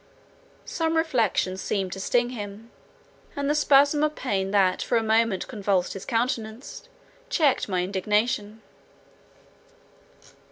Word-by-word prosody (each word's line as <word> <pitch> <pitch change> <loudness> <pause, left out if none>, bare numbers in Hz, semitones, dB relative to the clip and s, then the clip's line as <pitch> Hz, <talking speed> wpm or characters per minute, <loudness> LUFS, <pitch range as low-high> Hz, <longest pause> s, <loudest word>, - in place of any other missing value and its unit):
— - - -31 0.2
Some 325 -1 -1
reflection 230 - +1
seemed 190 -1 -2
to 190 - -7
sting 240 +5 +1
him, 215 0 -8 0.6
and 280 0 -2
the 295 - +2
spasm 290 0 +4
of 305 0 0
pain 195 -7 -2
that 195 -2 +2
for 235 - +1
a 225 - 0
moment 220 -3 +1
convulsed 200 -6 -1
his 195 - -8
countenance, 230 0 -3 0.4
checked 305 - +2
my 180 -2 0
indignation. 210 +3 -1
220 Hz, 125 wpm, -25 LUFS, 195-265 Hz, 0.6 s, spasm